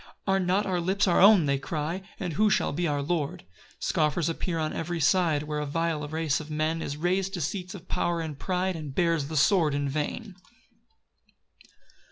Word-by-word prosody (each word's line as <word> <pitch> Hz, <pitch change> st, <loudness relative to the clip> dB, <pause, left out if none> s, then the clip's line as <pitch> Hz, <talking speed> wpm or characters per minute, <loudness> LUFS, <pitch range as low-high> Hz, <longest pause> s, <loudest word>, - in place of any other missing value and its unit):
"Are 195 Hz, -1 st, +2 dB
not 185 Hz, +3 st, +1 dB
our 185 Hz, -2 st, 0 dB
lips 195 Hz, +4 st, +1 dB
our 175 Hz, -, +4 dB
own" 200 Hz, -4 st, +7 dB
they 140 Hz, -1 st, +1 dB
cry, 160 Hz, +5 st, -3 dB, 0.2 s
"And 180 Hz, -5 st, -3 dB
who 210 Hz, +7 st, +3 dB
shall 190 Hz, -, +1 dB
be 170 Hz, +3 st, 0 dB
our 145 Hz, -2 st, -1 dB
lord?" 150 Hz, -, -2 dB, 0.3 s
4 -, -, -32 dB
Scoffers 155 Hz, +2 st, +1 dB
appear 165 Hz, +1 st, -2 dB
on 155 Hz, -1 st, -1 dB
every 170 Hz, +1 st, -3 dB
side, 160 Hz, -1 st, +2 dB
Where 150 Hz, 0 st, -3 dB
a 150 Hz, -, -2 dB
vile 160 Hz, 0 st, -1 dB
race 155 Hz, -2 st, 0 dB
of 155 Hz, -1 st, -9 dB
men 155 Hz, +2 st, -1 dB
Is 145 Hz, -, -4 dB
rais'd 185 Hz, +4 st, 0 dB
to -, -, -4 dB
seats 180 Hz, +5 st, -3 dB
of 185 Hz, -1 st, -11 dB
power 170 Hz, -1 st, -1 dB
and 155 Hz, -4 st, -5 dB
pride, 185 Hz, 0 st, -1 dB
And 150 Hz, -4 st, -7 dB
bears 165 Hz, -5 st, +1 dB
the 155 Hz, +1 st, -3 dB
sword 160 Hz, -2 st, +3 dB
in 145 Hz, 0 st, -1 dB
vain. 155 Hz, -, -3 dB
165 Hz, 200 wpm, -27 LUFS, 150-185 Hz, 0.3 s, own